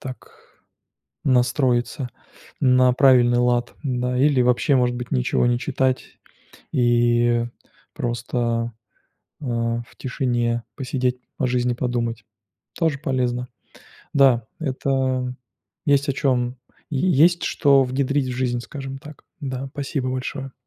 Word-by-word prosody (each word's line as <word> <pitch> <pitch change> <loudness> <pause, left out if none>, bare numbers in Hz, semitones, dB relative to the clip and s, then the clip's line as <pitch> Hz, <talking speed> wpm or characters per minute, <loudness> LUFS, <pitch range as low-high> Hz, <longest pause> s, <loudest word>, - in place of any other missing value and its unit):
так 130 -1 -9 0.9
настроиться 125 0 +1 0.5
на 125 -1 +5
правильный 125 -2 +5
лад, 120 0 +1
да. 125 -2 -1
Или 140 -1 +4
вообще, 125 +4 +3
может 125 -1 +2
быть, 125 0 -6
ничего 65 - +1
не 120 0 +2
читать 130 -1 -1 0.5
и 120 -1 +3 0.5
просто, 120 -1 -2 0.7
э, - - -6
в 115 -1 -2
тишине 120 -3 -1
посидеть, 125 -1 -1 0.2
о - - +1
жизни 125 0 +1
подумать. 120 -2 -2 0.5
Тоже 160 -5 0
полезно. 125 -3 -1 0.7
Да, 130 -5 +4
это 130 -3 -1 0.5
есть 140 0 +3
о 140 - +3
чем 125 -2 0 0.3
Е 155 +5 0
есть 175 +3 +4
что 140 -3 +4
внедрить 135 +2 0
в 125 - -4
жизнь, 125 -2 0
скажем 135 +1 -7
так, 150 +1 -13 0.2
да. 135 -2 -4
Спасибо 140 -2 -3
большое. 130 +1 -4
125 Hz, 115 wpm, -22 LUFS, 120-135 Hz, 0.9 s, на